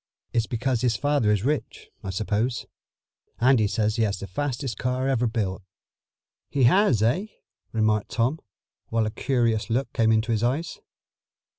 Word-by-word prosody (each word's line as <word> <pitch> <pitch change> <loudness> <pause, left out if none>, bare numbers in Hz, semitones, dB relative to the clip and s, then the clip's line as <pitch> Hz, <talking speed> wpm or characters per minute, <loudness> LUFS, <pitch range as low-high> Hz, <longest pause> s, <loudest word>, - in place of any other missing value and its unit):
It's 115 -2 +1
because 125 0 -1
his 120 -3 +2
father 145 -5 +2
is 105 -2 +1
rich, 150 0 -3
I 95 - -5
suppose. 110 +5 -1 0.7
Andy 120 -3 +4
says 110 +1 0
he - - +1
has 105 -3 +1
the 100 - -6
fastest 130 +1 -3
car 125 +1 -1
ever 125 -3 +1
built." 105 -4 -2 0.9
"He 140 - +1
has, 130 - +4
eh?" 145 - +1 0.4
remarked 110 -2 +1
Tom, 125 +7 0 0.5
while 115 -1 +1
a 110 - -2
curious 115 -3 0
look 125 +4 -1
came 115 -1 +3
into 110 +1 +2
his 110 -2 +1
eyes. 135 +8 -1
115 Hz, 155 wpm, -25 LUFS, 110-130 Hz, 0.9 s, Andy